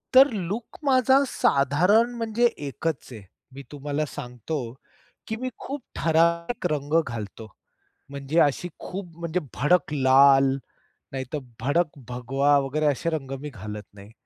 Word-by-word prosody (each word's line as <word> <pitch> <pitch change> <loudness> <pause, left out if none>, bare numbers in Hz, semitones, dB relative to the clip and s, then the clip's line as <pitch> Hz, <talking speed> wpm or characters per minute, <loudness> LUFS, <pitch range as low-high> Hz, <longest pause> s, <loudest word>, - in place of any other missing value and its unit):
तर 270 +2 +10
लूक 205 +4 -4
माझा 265 -1 +4
साधारण, 180 - +3
म्हणजे 230 +1 +1
एकच 145 +1 -4
आहे. 110 -4 -9 0.3
मी 140 - -9
तुम्हाला 145 +1 -2
सांगतो, 125 +4 -5 0.7
की 220 - -2
मी 255 - -1
खूप 280 0 -6
ठराविक 170 +5 +1
रंग 145 +1 -3
घालतो. 110 -1 -6 0.6
म्हणजे 140 +3 -2
अशी 145 +5 +2
खूप 195 0 -6
म्हणजे 170 +1 -2
भडक 150 +3 +2
लाल, 135 0 +6 0.6
नाहीतर 135 +2 -4 0.2
भडक 150 +5 0
भगवा 135 +4 +2
वगैरे 140 +3 -1
असे 150 +3 +1
रंग 140 -4 -4
मी 150 - -5
घालत 105 -2 -7
नाही. 100 +2 -14
145 Hz, 130 wpm, -25 LUFS, 135-175 Hz, 0.7 s, तर